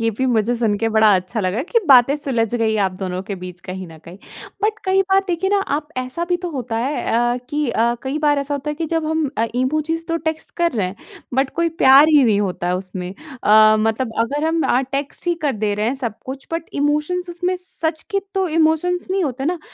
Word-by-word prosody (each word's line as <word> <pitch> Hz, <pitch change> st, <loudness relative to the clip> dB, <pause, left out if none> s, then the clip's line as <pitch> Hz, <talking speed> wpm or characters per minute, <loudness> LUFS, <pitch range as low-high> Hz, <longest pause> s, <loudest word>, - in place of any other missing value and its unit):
ये 230 Hz, 0 st, +1 dB
भी 260 Hz, +5 st, -2 dB
मुझे 220 Hz, +2 st, +1 dB
सुन 225 Hz, -3 st, +1 dB
के 225 Hz, -, 0 dB
बड़ा 220 Hz, -2 st, +5 dB
अच्छा 185 Hz, +5 st, -2 dB
लगा 195 Hz, +6 st, -1 dB
कि 470 Hz, -, +4 dB
बातें 265 Hz, 0 st, +7 dB
सुलझ 245 Hz, -6 st, -1 dB
गई 225 Hz, -2 st, +1 dB
आप 185 Hz, -, -4 dB
दोनों 185 Hz, 0 st, -3 dB
के 200 Hz, 0 st, -5 dB
बीच 180 Hz, -1 st, -8 dB
कहीं 185 Hz, 0 st, -7 dB
न 160 Hz, -1 st, -12 dB
कहीं। 175 Hz, +3 st, -11 dB, 0.4 s
बट 430 Hz, +1 st, +1 dB
कई 380 Hz, +1 st, +3 dB
बार 385 Hz, 0 st, +4 dB
देखिए 360 Hz, +2 st, 0 dB
ना 405 Hz, -, +3 dB, 0.2 s
आप 300 Hz, 0 st, -6 dB
ऐसा 255 Hz, +7 st, -3 dB
भी 355 Hz, 0 st, 0 dB
तो 350 Hz, -, -2 dB
होता 250 Hz, -6 st, -4 dB
है 270 Hz, +6 st, -1 dB, 0.3 s
अ, -, -, -2 dB
कि 295 Hz, -2 st, 0 dB
अ, 235 Hz, +1 st, +1 dB
कई 270 Hz, +2 st, -2 dB
बार 295 Hz, -1 st, +2 dB
ऐसा 280 Hz, +1 st, -2 dB
होता 285 Hz, +1 st, -3 dB
है 300 Hz, -, -3 dB
कि 325 Hz, +1 st, -3 dB
जब 325 Hz, -1 st, +1 dB
हम 315 Hz, -1 st, 0 dB
अ, 225 Hz, -, +3 dB
इमोजीज़ 310 Hz, +6 st, -1 dB
तो 330 Hz, -, 0 dB
टेक्स्ट 315 Hz, 0 st, -3 dB
कर 340 Hz, -1 st, +1 dB
रहे 205 Hz, -6 st, 0 dB
हैं 190 Hz, +2 st, -7 dB, 0.4 s
बट 265 Hz, 0 st, +1 dB
कोई 335 Hz, 0 st, +1 dB
प्यार 275 Hz, +4 st, +8 dB
ही 300 Hz, -3 st, +6 dB
नहीं 210 Hz, -3 st, +3 dB
होता 185 Hz, -3 st, -2 dB
है 180 Hz, +1 st, +1 dB
उसमें। 185 Hz, -1 st, -6 dB, 0.3 s
अ, 215 Hz, +1 st, +6 dB
मतलब 225 Hz, +1 st, -1 dB
अगर 285 Hz, +6 st, 0 dB
हम 325 Hz, 0 st, +1 dB
अ, 260 Hz, -1 st, +2 dB
टेक्स्ट 280 Hz, +4 st, -4 dB
ही 345 Hz, -, +2 dB
कर 285 Hz, -, +2 dB
दे 205 Hz, -1 st, +1 dB
रहे 210 Hz, +2 st, -1 dB
हैं 250 Hz, -, 0 dB
सब 220 Hz, -2 st, -3 dB
कुछ 265 Hz, +1 st, -7 dB
बट 330 Hz, 0 st, -3 dB
इमोशंस 300 Hz, +5 st, 0 dB
उसमें 355 Hz, +1 st, -2 dB
सच 325 Hz, -3 st, -4 dB
के 395 Hz, -, +1 dB
तो 380 Hz, -1 st, +1 dB
इमोशंस 335 Hz, +3 st, +1 dB
नहीं 380 Hz, -2 st, +1 dB
होते 265 Hz, -1 st, -3 dB
ना। 345 Hz, +3 st, 0 dB
270 Hz, 240 wpm, -20 LUFS, 220-320 Hz, 0.4 s, प्यार